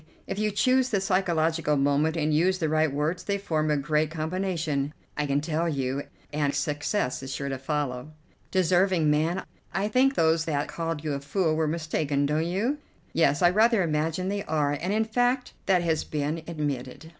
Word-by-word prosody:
If 200 Hz, -, -4 dB
you 215 Hz, 0 st, +1 dB
choose 255 Hz, +5 st, +2 dB
the 205 Hz, -5 st, +1 dB
psychological 165 Hz, -5 st, +1 dB
moment 145 Hz, +4 st, +2 dB
and 155 Hz, -1 st, +1 dB
use 180 Hz, +5 st, +3 dB
the 160 Hz, -4 st, -1 dB
right 155 Hz, -1 st, +2 dB
words 150 Hz, +5 st, -1 dB
they 200 Hz, -1 st, -1 dB
form 155 Hz, -6 st, -1 dB
a 150 Hz, -, +2 dB
great 150 Hz, +2 st, +1 dB
combination, 160 Hz, -3 st, -2 dB, 0.2 s
I 150 Hz, -1 st, -1 dB
can 140 Hz, +1 st, +1 dB
tell 165 Hz, +2 st, -1 dB
you, 135 Hz, -1 st, -2 dB, 0.3 s
and 145 Hz, -1 st, 0 dB
success 150 Hz, 0 st, -1 dB
is 135 Hz, 0 st, -6 dB
sure 140 Hz, 0 st, -3 dB
to 135 Hz, -1 st, -3 dB
follow." 135 Hz, -2 st, -2 dB, 0.4 s
"Deserving 180 Hz, -3 st, +3 dB
man! 160 Hz, +5 st, +1 dB, 0.3 s
I 195 Hz, +2 st, 0 dB
think 265 Hz, +4 st, +3 dB
those 160 Hz, 0 st, +3 dB
that 145 Hz, -3 st, -1 dB
called 165 Hz, -2 st, -4 dB
you 150 Hz, -2 st, -1 dB
a 140 Hz, -, -2 dB
fool 155 Hz, +3 st, 0 dB
were 160 Hz, 0 st, +1 dB
mistaken, 155 Hz, -3 st, 0 dB
don't 155 Hz, +3 st, 0 dB
you?" 225 Hz, +12 st, -1 dB, 0.3 s
"Yes, 145 Hz, -1 st, +3 dB
I 175 Hz, -, +6 dB
rather 220 Hz, +1 st, +4 dB
imagine 160 Hz, +3 st, -1 dB
they 200 Hz, 0 st, -2 dB
are, 150 Hz, -2 st, +1 dB
and 180 Hz, +3 st, -1 dB
in 220 Hz, +1 st, +2 dB
fact 245 Hz, +3 st, 0 dB
that 185 Hz, -3 st, +3 dB
has 160 Hz, -2 st, +1 dB
been 150 Hz, +2 st, -2 dB
admitted." 145 Hz, -2 st, -4 dB
160 Hz, 185 wpm, -27 LUFS, 150-185 Hz, 0.4 s, I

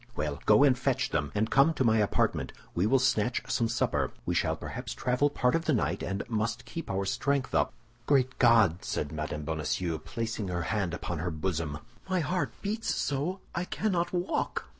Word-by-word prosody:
"Well, -, -, -2 dB
go -, -, +7 dB
and 135 Hz, -3 st, +5 dB
fetch 130 Hz, 0 st, 0 dB
them, 75 Hz, -1 st, -1 dB
and 110 Hz, +2 st, 0 dB
come 140 Hz, +5 st, +5 dB
to 130 Hz, -, +1 dB
my 110 Hz, -2 st, +4 dB
apartment. 105 Hz, -, +1 dB, 0.2 s
We 90 Hz, +4 st, +1 dB
will 135 Hz, -, +5 dB
snatch 125 Hz, -2 st, +1 dB
some 115 Hz, -3 st, +2 dB
supper; 115 Hz, -, 0 dB
we -, -, 0 dB
shall -, -, +1 dB
perhaps -, -, -6 dB
travel 125 Hz, +4 st, +2 dB
part 125 Hz, -3 st, +1 dB
of 165 Hz, 0 st, 0 dB
the 155 Hz, -, +2 dB
night, 95 Hz, -2 st, 0 dB
and 95 Hz, +1 st, -3 dB
must 115 Hz, +2 st, -2 dB
keep 165 Hz, -, -6 dB
our 95 Hz, 0 st, -1 dB
strength 140 Hz, +6 st, 0 dB
up." -, -, +2 dB, 0.4 s
"Great 130 Hz, -2 st, +2 dB
God!" 110 Hz, -8 st, +5 dB
said 75 Hz, -, -2 dB
Mme. 75 Hz, -1 st, -4 dB
Bonacieux, 80 Hz, +1 st, -1 dB
placing 115 Hz, +1 st, -4 dB
her 90 Hz, -2 st, -2 dB
hand 95 Hz, -2 st, -1 dB
upon 85 Hz, -2 st, -4 dB
her 90 Hz, +3 st, -1 dB
bosom, 80 Hz, -2 st, -2 dB, 0.3 s
"my 185 Hz, -1 st, +2 dB
heart 180 Hz, +3 st, -1 dB
beats 215 Hz, +3 st, -1 dB
so 150 Hz, +7 st, -1 dB
I 175 Hz, -, -1 dB
cannot 180 Hz, -2 st, -1 dB
walk." 180 Hz, 0 st, -2 dB
115 Hz, 190 wpm, -29 LUFS, 90-140 Hz, 0.4 s, go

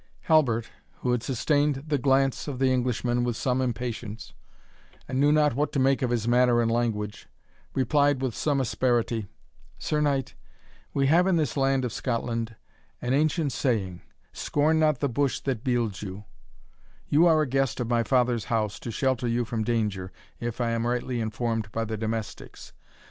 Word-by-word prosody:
Halbert, 125 Hz, -8 st, +2 dB, 0.3 s
who 125 Hz, -, 0 dB
had 125 Hz, -1 st, +1 dB
sustained 145 Hz, +2 st, 0 dB
the 150 Hz, -2 st, 0 dB
glance 135 Hz, +1 st, +2 dB
of 140 Hz, -3 st, -4 dB
the 130 Hz, 0 st, +2 dB
Englishman 120 Hz, -1 st, 0 dB
with 120 Hz, -2 st, -1 dB
some 130 Hz, 0 st, 0 dB
impatience, 115 Hz, -3 st, -4 dB, 0.7 s
and 130 Hz, -, -2 dB
knew 145 Hz, +1 st, +4 dB
not 150 Hz, -2 st, +3 dB
what 145 Hz, +5 st, 0 dB
to 140 Hz, -, +1 dB
make 135 Hz, +1 st, +3 dB
of 125 Hz, -, +1 dB
his 120 Hz, -2 st, -1 dB
manner 120 Hz, 0 st, +4 dB
and 115 Hz, -1 st, +1 dB
language, 110 Hz, -3 st, -2 dB, 0.5 s
replied 145 Hz, +1 st, +2 dB
with 130 Hz, -3 st, -2 dB
some 145 Hz, +2 st, 0 dB
asperity, 120 Hz, -3 st, 0 dB, 0.5 s
"Sir 150 Hz, -1 st, -1 dB
Knight, 140 Hz, -3 st, 0 dB, 0.6 s
we 140 Hz, -, +1 dB
have 170 Hz, +6 st, +4 dB
in 190 Hz, -, +3 dB
this 155 Hz, -6 st, 0 dB
land 135 Hz, -2 st, +2 dB
of 120 Hz, -, -4 dB
Scotland 115 Hz, -2 st, -2 dB, 0.4 s
an 125 Hz, +1 st, -1 dB
ancient 155 Hz, +1 st, +1 dB
saying, 105 Hz, -10 st, -1 dB, 0.3 s
'Scorn 155 Hz, +2 st, +1 dB
not 155 Hz, -4 st, +2 dB
the 140 Hz, -, +2 dB
bush 135 Hz, +2 st, 0 dB
that 125 Hz, -5 st, -2 dB
bields 120 Hz, -7 st, -1 dB
you' 100 Hz, +1 st, -7 dB, 0.8 s
you 160 Hz, +4 st, +5 dB
are 155 Hz, -2 st, +4 dB
a -, -, -3 dB
guest 135 Hz, 0 st, 0 dB
of 120 Hz, -, -1 dB
my 120 Hz, 0 st, +2 dB
father's 125 Hz, -2 st, +1 dB
house 110 Hz, -3 st, -1 dB
to -, -, -7 dB
shelter 125 Hz, +1 st, 0 dB
you 120 Hz, +1 st, 0 dB
from 110 Hz, -1 st, -2 dB
danger, 105 Hz, -5 st, -1 dB, 0.3 s
if 120 Hz, 0 st, -4 dB
I 120 Hz, -1 st, 0 dB
am 115 Hz, 0 st, -1 dB
rightly 120 Hz, 0 st, -1 dB
informed 110 Hz, -1 st, -2 dB
by 115 Hz, +1 st, -2 dB
the 110 Hz, 0 st, -3 dB
domestics. 110 Hz, -1 st, -5 dB
125 Hz, 175 wpm, -26 LUFS, 115-135 Hz, 0.8 s, you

